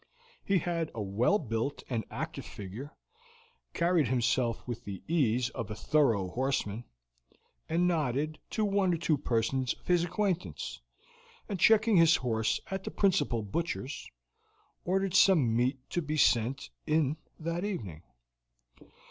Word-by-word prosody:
He 195 - +2
had 170 -1 -1
a 110 - -3
well 110 - +2
built 120 - -3
and 115 -4 -2
active - - -5
figure, 110 +10 -8 0.8
carried 170 -4 +3
himself 120 -1 0
with 120 -1 -5
the 100 -4 -7
ease 125 -7 +1
of 115 - -5
a 105 - -4
thorough 115 -7 +2
horseman, 120 -1 -2 0.8
and 170 +2 +2
nodded 155 -2 0
to 215 - 0
one 195 -3 +2
or - - -3
two 160 -1 +1
persons 125 0 0
of - - -27
his 175 -1 +3
acquaintance, 180 0 -2 0.7
and 200 -4 -4
checking 220 +1 +5
his 165 -1 +6
horse 110 -3 0
at 190 0 -3
the - - -4
principal 180 - +1
butcher's, 150 - -4 0.8
ordered 190 0 0
some 160 - +5
meat 125 +3 +2
to 175 - 0
be 155 0 -3
sent 120 - +2 0.2
in 155 -1 +2 0.2
that 170 +2 -2
evening. 105 - -4
145 Hz, 140 wpm, -30 LUFS, 115-175 Hz, 0.8 s, his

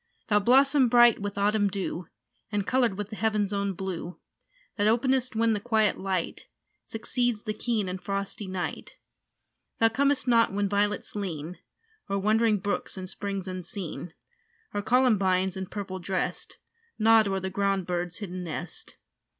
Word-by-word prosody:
Thou 210 -1 +5
blossom 270 +4 +5
bright 240 -1 +6
with 205 0 -4
autumn 205 +1 +2
dew, 185 -3 -4 0.4
And 205 -2 -1
coloured 245 -6 +1
with 205 0 -5
the - - -5
heaven's 210 -2 0
own 200 -1 -1
blue, 180 -1 -5 0.6
That 205 0 +1
openest 255 +2 +2
when 225 0 +3
the 210 - -1
quiet 220 -1 +1
light 190 -3 -3 0.4
Succeeds 235 0 -1
the 215 - -2
keen 215 -2 -1
and 185 0 -4
frosty 200 0 -3
night. 185 -1 -4 0.8
Thou 225 - +4
comest 275 +3 +1
not 230 -3 +4
when 200 +1 0
violets 205 +1 -1
lean 180 -4 -4 0.5
O'er 200 - 0
wandering 215 +2 +3
brooks 200 0 -3
and 185 0 -5
springs 195 0 -4
unseen, 185 -2 -6 0.6
Or 205 - -1
columbines, 195 -6 +2
in 190 -1 -4
purple 190 -2 -5
dressed, 185 +1 -3 0.4
Nod 225 -1 +5
o'er 195 -1 0
the 190 0 -4
ground 195 -1 0
bird's 175 0 -3
hidden 185 -4 -5
nest. 170 0 -7
205 Hz, 150 wpm, -27 LUFS, 190-225 Hz, 0.8 s, bright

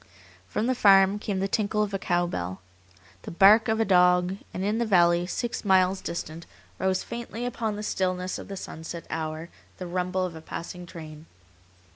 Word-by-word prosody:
From 210 - -2
the 255 - +2
farm 195 -3 +5
came 200 -3 -2
the 195 - +1
tinkle 210 +1 0
of 205 -1 -4
a 195 - -1
cow 175 -2 +1
bell, 90 - -4 0.6
the - - -8
bark 205 +5 +6
of 220 0 +1
a 225 - +3
dog, 180 0 +4
and 185 - -4
in 210 +3 0
the 235 - +1
valley, 175 -3 +4
six 240 +5 -3
miles 190 -1 +3
distant, 165 -1 -6 0.3
rose 190 0 0
faintly 235 0 -6
upon 225 -3 -2
the 210 - -6
stillness 185 -2 -2
of - - -9
the 195 - -6
sunset 165 -1 -7
hour 160 +1 -4 0.3
the 185 - -6
rumble 180 +1 -1
of 180 - -5
a 160 - -9
passing 175 +2 -7
train. 155 -2 -10
185 Hz, 185 wpm, -26 LUFS, 175-205 Hz, 0.6 s, bark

